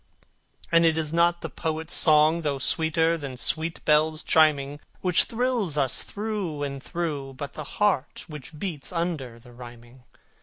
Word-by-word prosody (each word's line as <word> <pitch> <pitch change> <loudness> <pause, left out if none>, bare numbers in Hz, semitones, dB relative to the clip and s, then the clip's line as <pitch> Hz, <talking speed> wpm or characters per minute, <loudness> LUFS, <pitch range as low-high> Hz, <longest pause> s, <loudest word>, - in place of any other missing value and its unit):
And 170 0 +5
it 160 -1 +3
is 155 -1 -2
not 170 +1 +3
the - - -4
poet's 160 0 -3
song, 155 +1 +4
though 145 -3 -1
sweeter 160 +3 +1
than 135 -4 -6
sweet 160 +5 0
bells 155 +1 +3
chiming, 145 -3 +3 0.2
Which 180 -2 +3
thrills 230 - -1
us 135 -3 +1
through 200 -8 -4
and 140 -1 -4
through, 145 -5 -4
but 140 +1 -6
the 155 - -6
heart 200 -10 0
which 150 -1 -10
beats 160 -4 -5
under 165 -9 -3
the 120 +1 -16
rhyming. 120 +1 -13
155 Hz, 155 wpm, -26 LUFS, 140-170 Hz, 0.2 s, And